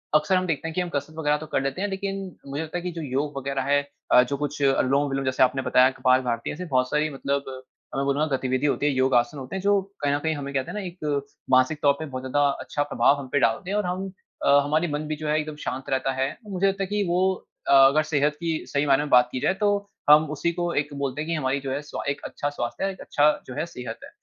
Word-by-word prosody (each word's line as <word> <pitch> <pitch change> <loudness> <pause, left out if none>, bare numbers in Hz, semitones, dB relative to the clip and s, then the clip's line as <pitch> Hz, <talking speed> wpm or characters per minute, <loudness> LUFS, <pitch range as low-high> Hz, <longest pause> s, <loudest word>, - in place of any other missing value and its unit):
अक्सर 155 +5 +3
हम 185 0 +1
देखते 165 -1 -2
हैं 165 - -5
कि 180 - +1
हम 180 - -3
कसरत 145 0 -4
वगैरह 150 -1 +2
तो 155 - -8
कर - - +2
लेते 135 +7 -2
हैं, 205 - 0
लेकिन 195 0 -3 0.3
मुझे 140 +2 -3
लगता 160 +2 -5
है - - -4
कि 180 - -3
जो 165 -1 -6
योग 140 0 -2
वगैरह 135 0 -2
है 145 0 +4 0.3
अ, 125 - +8
जो 140 +2 -3
कुछ 145 0 -4
अनुलोम-विलोम 135 0 +2
जैसे 130 0 +3
आपने 130 +1 +2
बताया 130 0 +5
कपाल 130 0 +4
भारती 115 0 -2
है - - -3
ऐसी 180 +4 -6
बहुत 130 -5 +1
सारी 150 +2 +1
मतलब 140 +1 -1 0.5
मैं 135 - 0
बोलूँगा, 140 +2 +1
गतिविधि 130 +1 -1
होती 145 - 0
है, 145 - +3
योग 130 0 +2
आसन 120 +4 +2
होते 130 +5 -7
हैं, 190 - -3
जो 200 0 +3 0.2
कहीं 145 -1 +1
न - - +2
कहीं 160 0 +1
हमें, 140 -1 -6
कहते 130 -2 -2
हैं - - -8
ना - - -2
एक 150 -5 -3 0.3
मानसिक 130 +4 +3
तौर 140 -1 +5
पे 160 - -4
बहुत 130 -3 -6
ज़्यादा 130 +2 0 0.2
अच्छा 145 - -2
प्रभाव 145 - +3
हम 135 - -7
पे 145 - +4
डालते 115 +9 +1
हैं 205 - +1
और 210 - 0
हम 185 +2 -3 0.3
अ, - - +3
हमारी 155 +4 +1
मन 150 +1 -3
भी 155 - -2
जो 155 +1 -6
है, 150 +1 +2
एकदम 155 0 -5
शांत 130 +1 -4
रहता 135 0 0
है। 135 +1 +1
तो 210 - -13
मुझे 190 +1 +1
लगता 195 0 0
है 190 - -3
कि 205 +1 0
वो 175 +1 +1 0.5
अ, - - +5
अगर 135 +3 +6
सेहत 150 +1 +2
की 165 -2 -1
सही 145 0 0
मायने 140 0 +3
में 150 - -5
बात 125 -1 +5
की 130 - -3
जाए, - - +2
तो 205 +1 +2 0.3
हम 150 +1 +7
उसी 170 - 0
को 175 0 -2
एक 150 - -9
बोलते 140 +1 -2
हैं 155 - -5
कि - - 0
हमारी 140 -2 0
जो 135 -1 -4
है, 140 +2 -2
स्वा 150 - -6
एक 140 - -3
अच्छा 145 - -3
स्वास्थ्य 120 -1 -4
है, 195 - 0
एक 190 - -12
अच्छा 150 0 +3 0.2
जो 130 - -7
है, 150 +3 -1
सेहत 125 -7 -7
है। - - -10
145 Hz, 280 wpm, -25 LUFS, 135-160 Hz, 0.5 s, अ